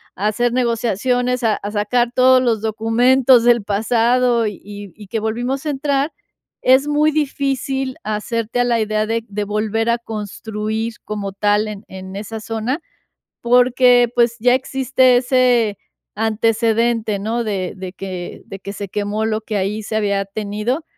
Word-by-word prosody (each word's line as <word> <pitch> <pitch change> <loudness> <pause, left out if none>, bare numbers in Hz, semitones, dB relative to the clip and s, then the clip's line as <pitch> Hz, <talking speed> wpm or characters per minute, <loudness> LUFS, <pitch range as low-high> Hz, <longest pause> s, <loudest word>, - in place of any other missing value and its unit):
a 200 +3 -1
hacer 240 +3 +1
negociaciones, 245 +1 0
a 220 -2 +3
a 205 - -6
sacar 235 +3 0
todos 255 0 +5
los 230 -4 +1
documentos 235 +3 +3
del 240 -2 +4
pasado, 230 +3 +2
y 210 - -4
y 205 -1 -9
y 210 -2 -12
que 225 +3 -2
volvimos 245 +6 -2
a - - -1
entrar, 280 +1 0 0.5
es 260 +3 +4
muy 300 +1 +3
difícil 270 -3 -1
hacerte 220 +2 -2
a 245 - +3
la 235 -2 +1
idea 215 0 0
de 230 +1 -1
de 205 +1 -3
volver 215 +2 -1
a 235 - +3
construir 220 0 -4
como 205 -2 -4
tal 205 +2 +1
en 210 0 -8
en 190 0 -9
esa 220 +2 -6
zona, 225 +7 -3 0.6
porque, 245 0 +4
pues, 235 -1 +2
ya 245 +2 +4
existe 260 -1 +2
ese 245 -4 +2 0.4
antecedente, 225 0 +1
¿no? 230 +3 -2
De 195 -4 -3
de 185 -1 -7
que 185 -3 -7
de 195 - -8
que 200 - -7
se 200 0 -6
quemó 205 +2 -2
lo 220 0 -1
que 215 -1 -4
ahí 205 +3 -1
se 215 - -6
había 200 -2 0
tenido. 210 +8 -3
225 Hz, 160 wpm, -19 LUFS, 210-250 Hz, 0.6 s, todos